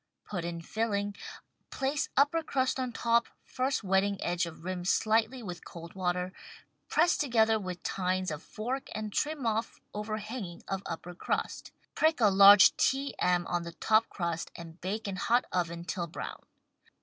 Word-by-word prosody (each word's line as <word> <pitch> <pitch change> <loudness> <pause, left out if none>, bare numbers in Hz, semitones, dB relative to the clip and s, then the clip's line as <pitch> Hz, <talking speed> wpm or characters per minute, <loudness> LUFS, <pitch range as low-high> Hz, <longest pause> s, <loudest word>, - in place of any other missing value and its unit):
Put 180 -5 -4
in 170 -1 -4
filling, 205 -1 -1 0.5
place 275 +2 -1
upper 290 +4 +4
crust 265 -4 0
on 255 -1 -2
top, 235 0 +2 0.2
first 260 -1 -1
wetting 195 +1 +2
edge 175 0 0
of 165 -1 -11
rim 180 0 -3
slightly 220 +6 +2
with 180 -4 -7
cold 170 0 -10
water, 180 0 -1 0.6
press 340 +3 +4
together 225 -5 +3
with 180 -3 -6
tines 185 -1 -1
of 150 0 -5
fork 250 +5 -4
and 215 -1 -4
trim 295 -3 -1
off 225 0 -1
overhanging 210 -3 -5
of 195 -1 -2
upper 175 +1 -6
crust. 175 - -3 0.2
Prick 315 -2 +2
a 215 -3 +6
large 200 +1 +9
T. 275 +1 +1
M. 180 -1 +2
on 175 0 -1
the 170 0 -7
top 220 +5 +2
crust 170 -3 -3
and 165 0 -10
bake 210 +4 -3
in 195 -2 -3
hot 240 +6 +2
oven 170 -1 -2
till 175 0 -3
brown. 160 - -7
200 Hz, 160 wpm, -30 LUFS, 175-235 Hz, 0.6 s, large